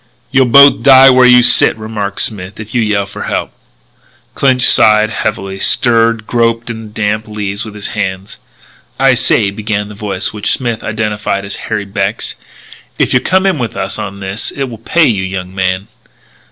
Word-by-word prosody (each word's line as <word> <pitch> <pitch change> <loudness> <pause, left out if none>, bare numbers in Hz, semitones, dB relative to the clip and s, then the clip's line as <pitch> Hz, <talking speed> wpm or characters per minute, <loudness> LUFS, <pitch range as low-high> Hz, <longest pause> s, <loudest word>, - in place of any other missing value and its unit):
"You'll 130 -1 +3
both 140 +3 +6
die 135 -1 +7
where 130 0 +5
you 125 0 +6
sit," 120 - +5
remarked 105 -2 -4
Smith, 95 -2 -3
"if 110 0 -9
you 120 - +1
yell 105 -2 0
for 100 - -8
help." - - -3 0.8
Clinch 130 -2 +1
sighed 110 0 +4
heavily, 95 -2 -4
stirred, 115 -1 +2
groped 115 0 -1
on 110 -1 -8
the 110 - -10
damp 105 0 -3
leaves 100 -1 -4
with 105 -1 -10
his 105 - -4
hands. 95 -2 -5 0.6
"I 135 -1 +4
say," 110 -4 +1
began 105 0 -4
the - - -10
voice 100 -2 -3
which 105 -1 -1
Smith 120 -4 -3
identified 105 -2 -3
as 100 - -5
Harry 105 -2 -2
Beck's, 100 +2 -3 0.6
"if - - 0
you'll 125 - +3
come 190 +1 +1
in 190 -6 0
with 115 -3 -4
us 95 0 -4
on 100 0 -7
this 95 +3 -3
it 140 - -5
will 120 -5 -7
pay 165 +8 +1
you, 105 -8 0
young 95 -1 -6
man." 95 0 -2
110 Hz, 180 wpm, -12 LUFS, 100-120 Hz, 0.8 s, die